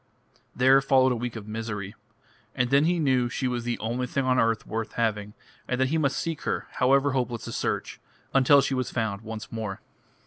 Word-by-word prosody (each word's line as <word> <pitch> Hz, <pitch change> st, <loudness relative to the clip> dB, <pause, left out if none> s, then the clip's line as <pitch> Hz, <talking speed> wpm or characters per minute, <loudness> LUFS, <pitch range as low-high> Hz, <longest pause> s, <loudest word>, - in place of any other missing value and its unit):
There 130 Hz, +2 st, +5 dB
followed 130 Hz, -1 st, +4 dB
a -, -, +1 dB
week 120 Hz, 0 st, -4 dB
of 110 Hz, -2 st, -8 dB
misery. 105 Hz, -2 st, -5 dB, 0.6 s
And 125 Hz, 0 st, 0 dB
then 140 Hz, +2 st, +5 dB
he 175 Hz, +1 st, +2 dB
knew 130 Hz, -6 st, +2 dB
she 130 Hz, +3 st, -2 dB
was 120 Hz, -1 st, -3 dB
the 120 Hz, 0 st, -1 dB
only 120 Hz, +3 st, -2 dB
thing 135 Hz, +2 st, -1 dB
on 130 Hz, -1 st, +3 dB
earth 115 Hz, -1 st, +1 dB
worth 110 Hz, 0 st, -4 dB
having, 105 Hz, -3 st, -1 dB, 0.3 s
and 125 Hz, -, -1 dB
that 130 Hz, 0 st, +2 dB
he 160 Hz, +2 st, +1 dB
must 140 Hz, -3 st, +1 dB
seek 165 Hz, -2 st, -3 dB
her, -, -, -2 dB
however 135 Hz, +2 st, +3 dB
hopeless 125 Hz, -3 st, -2 dB
the -, -, -6 dB
search, -, -, -3 dB, 0.3 s
until 140 Hz, +1 st, +6 dB
she 135 Hz, -, -1 dB
was 130 Hz, -1 st, -1 dB
found 110 Hz, -4 st, -2 dB
once 110 Hz, -1 st, -7 dB
more. 110 Hz, -4 st, -4 dB
125 Hz, 205 wpm, -26 LUFS, 110-135 Hz, 0.6 s, until